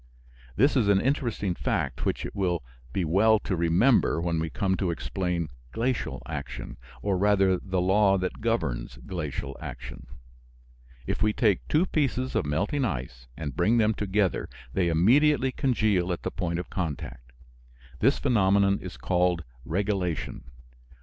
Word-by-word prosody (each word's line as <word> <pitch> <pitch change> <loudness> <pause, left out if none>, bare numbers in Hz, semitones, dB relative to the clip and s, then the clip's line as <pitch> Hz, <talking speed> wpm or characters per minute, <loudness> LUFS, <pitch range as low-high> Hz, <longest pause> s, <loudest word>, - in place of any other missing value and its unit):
This 140 +7 +3
is 120 -6 +3
an 100 -1 +5
interesting 120 -7 0
fact - - -2
which - - -1
it - - -7
will 90 -6 0 0.3
be 90 +5 -1
well 105 +7 +4
to 95 - -2
remember 85 +6 +3
when 85 -1 0
we 80 0 -2
come 95 +4 0
to 95 - 0
explain 85 -1 -2 0.2
glacial 115 - -2
action, - - -6 0.3
or 100 -3 +1
rather 95 -2 +3
the 95 -2 -2
law 95 +2 +4
that 95 +3 -3
governs 65 - -1
glacial 75 -5 -4
action. - - -8 1.0
If - - -3
we 110 0 +3
take 105 -5 +1
two 155 +4 +3
pieces 130 -6 0
of - - 0
melting 100 - 0
ice 60 - -4
and 75 -5 -5
bring 115 +2 +3
them 110 -1 +3
together 100 -2 0 0.2
they 90 +2 +1
immediately 130 - +4
congeal 110 -9 +1
at 85 - -4
the - - -2
point 85 -2 -2
of 90 - -6
contact. 65 -8 -5 0.7
This 135 +5 +3
phenomenon 100 -5 +3
is 90 - -8
called 90 -2 +1 0.2
"regelation." 90 - -2
95 Hz, 150 wpm, -27 LUFS, 85-110 Hz, 1.0 s, an